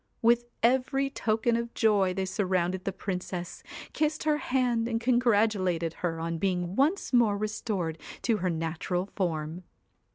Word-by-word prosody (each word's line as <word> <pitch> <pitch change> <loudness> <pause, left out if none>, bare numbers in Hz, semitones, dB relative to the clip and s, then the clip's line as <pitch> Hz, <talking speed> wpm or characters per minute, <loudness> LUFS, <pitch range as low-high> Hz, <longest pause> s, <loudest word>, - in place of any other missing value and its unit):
With 235 +1 +4 0.2
every 265 +3 +2
token 225 +1 +1
of 235 0 -3
joy 200 -5 +3
they 190 0 -1
surrounded 185 -1 -1
the 195 - 0
Princess, 180 -2 -5 0.3
kissed 310 0 0
her 305 -1 +2
hand, 245 -4 +1
and 230 -1 -1
congratulated 210 -8 +2
her 165 -2 -1
on 165 0 -3
being 180 -1 -1
once 295 - +1
more 225 -4 +4
restored 200 -6 -2 0.2
to 230 -3 +2
her 185 -2 -1
natural 165 +2 -2
form. 165 -2 -2
205 Hz, 140 wpm, -28 LUFS, 180-235 Hz, 0.3 s, With